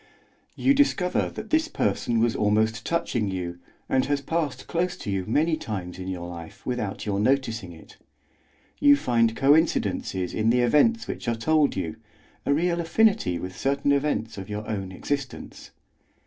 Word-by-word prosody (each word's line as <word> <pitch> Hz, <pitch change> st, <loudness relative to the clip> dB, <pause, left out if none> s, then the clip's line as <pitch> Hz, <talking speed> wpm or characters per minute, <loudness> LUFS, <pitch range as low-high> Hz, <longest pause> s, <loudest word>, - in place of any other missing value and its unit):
You 275 Hz, -, +3 dB
discover 265 Hz, -11 st, +2 dB
that 220 Hz, -, -8 dB
this 315 Hz, 0 st, +3 dB
person 120 Hz, -, 0 dB
was 115 Hz, 0 st, +2 dB
almost 110 Hz, +1 st, +1 dB
touching 120 Hz, -10 st, 0 dB
you 90 Hz, -2 st, -4 dB, 0.3 s
and 130 Hz, -, +2 dB
has 145 Hz, 0 st, +1 dB
passed 150 Hz, 0 st, -2 dB
close 175 Hz, +1 st, -1 dB
to 100 Hz, -, -5 dB
you 95 Hz, -1 st, -2 dB
many 155 Hz, +8 st, +2 dB
times 95 Hz, -9 st, -6 dB
in 95 Hz, -, -6 dB
your 90 Hz, -2 st, -4 dB
life 85 Hz, -2 st, -10 dB
without 120 Hz, -6 st, -3 dB
your 100 Hz, -2 st, -1 dB
noticing 110 Hz, -5 st, 0 dB
it; 80 Hz, -, -15 dB, 0.8 s
you 285 Hz, 0 st, +7 dB
find 115 Hz, -, +1 dB
coincidences 135 Hz, -, +2 dB
in 110 Hz, +1 st, +1 dB
the 125 Hz, +1 st, +3 dB
events 185 Hz, -, +3 dB
which -, -, -6 dB
are 120 Hz, -, +1 dB
told 150 Hz, +5 st, +2 dB
you, 85 Hz, -5 st, -3 dB, 0.5 s
a -, -, +3 dB
real 170 Hz, +2 st, +1 dB
affinity 195 Hz, -, +2 dB
with 90 Hz, +1 st, -6 dB
certain 140 Hz, +1 st, 0 dB
events 140 Hz, -7 st, 0 dB
of 95 Hz, -, -8 dB
your 105 Hz, +1 st, -5 dB
own 95 Hz, -3 st, -3 dB
existence. 140 Hz, +7 st, -5 dB
120 Hz, 160 wpm, -25 LUFS, 100-155 Hz, 0.8 s, you